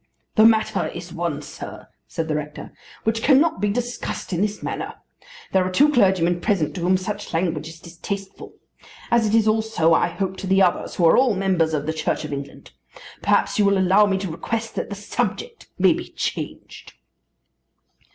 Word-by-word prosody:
"The 220 - +5
matter 220 -1 +3
is - - -8
one, - - -3
sir," - - -9 0.2
said 165 -2 -4
the 155 - -1
rector, 150 0 -5 0.3
"which 225 0 0
cannot 280 - +3
be 205 - +2
discussed 240 -2 -4
in 175 - 0
this 210 0 -2
manner. - - -4 0.6
There 190 -1 +3
are 185 - -1
two 285 +11 +4
clergymen 185 - +3
present 175 -7 0
to 180 - -6
whom 185 +2 +3
such 185 -2 -5
language 165 -3 -1
is 165 0 -11
distasteful; 190 +4 -7 0.6
as 235 -2 +3
it 215 - +2
is 220 -1 +3
also 215 -7 +2
I 165 - +3
hope 190 +2 -3
to 195 - -6
the 190 +1 +3
others 180 - 0
who 175 - +2
are 165 - +6
all 255 -5 +3
members 180 -5 +1
of 145 -1 -2
the 160 - -1
Church 155 0 -2
of 150 - -5
England. 140 0 -8 0.5
Perhaps - - +1
you 205 - +4
will 200 0 +3
allow 190 +3 +4
me 195 -1 +1
to 190 -3 -4
request 225 +7 -4
that - - -4
the 200 - -5
subject 455 - -4
may - - +5
be - - -6
changed." - - -6
190 Hz, 190 wpm, -22 LUFS, 170-220 Hz, 0.6 s, are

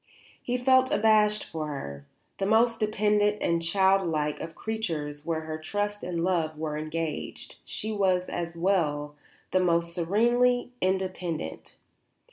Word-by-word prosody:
He 250 0 -1
felt 260 +1 +4
abashed 210 -1 +4
before 155 -1 -5
her. 70 - -6 0.3
The 195 - 0
most 230 +2 +3
dependent 210 -1 +2
and 170 0 +1
child 190 +3 +3
like 150 -3 -1
of 160 - -7
creatures 160 -10 -4
where 160 -1 0
her 155 0 -5
trust 205 +5 -3
and 170 -2 -2
love 165 -4 0
were 155 -1 -3
engaged, 155 0 -4
she 220 - -4
was, 190 -3 +2
as 170 -1 -4
well, 155 -5 +1 0.4
the 185 - +3
most 170 -1 +1
serenely 240 +8 +2
independent. 185 - -2
180 Hz, 135 wpm, -27 LUFS, 160-210 Hz, 0.4 s, felt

